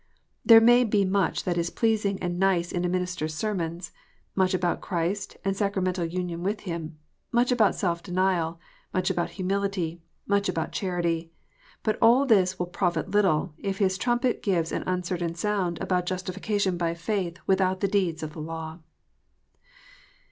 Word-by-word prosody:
There 225 -2 +9
may 240 +2 +6
be 205 -3 +2
much 190 -2 +1
that 175 -1 0
is 170 0 0
pleasing 215 -3 +1
and 175 0 -2
nice 185 -3 +2
in 175 - -1
a 180 - +1
minister 180 -2 -1
s 155 0 -5
sermons, 175 -3 -3 0.4
much 185 -1 +2
about 175 -1 0
Christ 185 +2 -2
and 195 0 +1
sacramental 190 -3 0
union 175 0 -3
with 200 +4 -2
Him, 165 -4 -5 0.3
much 245 +1 +2
about 225 -5 +3
self 170 -3 -1
denial, 180 -3 0 0.4
much 185 -1 +1
about 175 - -1
humility, 190 -3 -1 0.2
much 200 -1 +1
about 165 -3 -2
charity. 170 -3 -2 0.5
But 215 - 0
all 240 +5 +6
this 190 -6 +3
will 180 - -1
profit 175 0 -1
little, 190 -5 +2
if 195 -1 -3
his 190 -2 +1
trumpet 240 0 +1
gives 170 -5 0
an - - -2
uncertain 180 -2 -2
sound 180 -2 -1
about 180 -1 0
justification 185 +1 -1
by 170 -1 -1
faith 180 -1 -2
without 190 -1 +2
the 200 - +2
deeds 185 -5 0
of 155 -1 -5
the 155 - -7
law. 160 +1 -6
185 Hz, 160 wpm, -26 LUFS, 170-200 Hz, 0.5 s, There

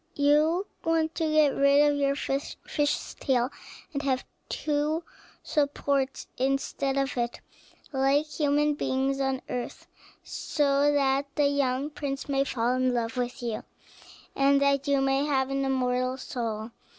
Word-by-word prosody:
You 305 +6 +3 0.2
want 325 -1 +1
to 320 -2 -1
get 310 -1 +5
rid 280 +1 +4
of - - -1
your 280 -1 +1
fish's 290 +1 -2
tail, 255 0 +1 0.4
and 280 - -2
to 285 - -4
have 255 -1 0 0.2
two 305 +2 -1 0.4
supports 280 -2 0
instead 275 +1 0
of 275 -1 0
it, 240 0 -2 0.5
like 275 +2 +3
human 295 0 +1
beings 270 -1 -1
on 270 -1 -1
earth, 250 -1 -5 0.4
so 285 -1 +1
that 275 -1 +2
the 295 - +3
young 280 0 0
prince 275 -2 -4
may 275 -1 +2
fall 245 -2 0
in 255 -1 +1
love 235 +1 -1
with 245 0 -3
you, 230 -2 -3 0.7
and 275 0 +4
that 280 0 +2
you 280 -1 +3
may 270 +1 +2
have 270 -2 +1
an 275 0 0
immortal 255 -1 0
soul." 230 -4 -4
275 Hz, 145 wpm, -27 LUFS, 260-290 Hz, 0.7 s, get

